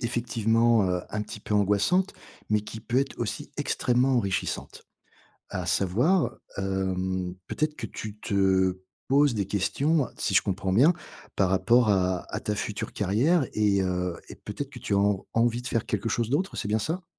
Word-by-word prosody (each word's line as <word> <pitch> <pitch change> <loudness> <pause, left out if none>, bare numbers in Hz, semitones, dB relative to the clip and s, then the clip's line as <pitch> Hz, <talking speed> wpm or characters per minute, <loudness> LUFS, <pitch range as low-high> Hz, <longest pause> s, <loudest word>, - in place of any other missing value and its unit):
effectivement, 115 -2 +2
heu, 90 -1 0
un 105 - -2
petit 105 0 -8
peu 105 - -3
angoissante, 105 - +2 0.4
mais 105 0 +3
qui 110 +1 -8
peut 120 +3 0
être 135 0 -1
aussi 115 -4 -4
extrêmement 125 +2 +1
enrichissante. 100 -6 -2 0.6
À 90 -1 -4
savoir, 110 - +2 0.2
hem, 95 -1 -1
peut - - -6
être 155 0 0
que 110 - -5
tu 105 0 -7
te 95 -2 +2 0.3
poses 140 -2 +4
des 100 -3 -1
questions, 140 - +1
si - - -1
je - - +6
comprends 95 -1 -2
bien 135 - +6 0.4
par 95 -2 +2
rapport 120 +5 +4
à 95 -2 +1
à - - -2
ta 105 - -2
future 105 0 -4
carrière 125 - +2
et 100 -2 +2
heu, 90 -1 -1
et - - -8
peut 105 - -8
être 140 -1 -3
que - - -10
tu 100 - -2
as - - +3
en 100 -1 +1
envie 120 +1 +2
de - - -9
faire 115 - -1
quelque 105 +2 -1
chose 115 0 -1
d'autre. 180 +8 0
C'est 105 - -3
bien 110 - +2
ça? 165 - -3
105 Hz, 185 wpm, -27 LUFS, 95-125 Hz, 0.6 s, je